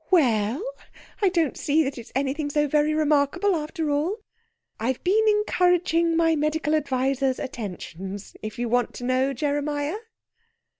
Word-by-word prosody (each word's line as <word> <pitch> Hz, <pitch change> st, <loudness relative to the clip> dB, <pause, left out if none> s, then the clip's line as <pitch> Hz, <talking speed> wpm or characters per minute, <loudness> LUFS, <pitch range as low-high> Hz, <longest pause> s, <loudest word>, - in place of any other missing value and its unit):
"We 360 Hz, -4 st, +6 dB
ell! 225 Hz, -, 0 dB, 0.6 s
I 395 Hz, -, +5 dB
don't 335 Hz, -6 st, +1 dB
see 315 Hz, +1 st, +2 dB
that 270 Hz, -2 st, -4 dB
it's 230 Hz, -, -11 dB
anything 280 Hz, +2 st, -1 dB
so 295 Hz, 0 st, +1 dB
very 300 Hz, +1 st, +2 dB
remarkable, 310 Hz, +6 st, +2 dB
after 310 Hz, 0 st, -2 dB
all. 310 Hz, +9 st, 0 dB, 0.6 s
I've 245 Hz, +3 st, -2 dB
been 410 Hz, +5 st, +3 dB
encouraging 355 Hz, -5 st, +2 dB
my 325 Hz, -1 st, +3 dB
medical 305 Hz, 0 st, 0 dB
adviser's 270 Hz, -2 st, +1 dB
attentions, 195 Hz, -4 st, -7 dB
if 215 Hz, 0 st, -6 dB
you 240 Hz, 0 st, -1 dB
want 245 Hz, +1 st, 0 dB
to -, -, -7 dB
know, 255 Hz, +2 st, +1 dB
Jeremiah." 290 Hz, -, -1 dB
290 Hz, 145 wpm, -25 LUFS, 260-325 Hz, 0.6 s, We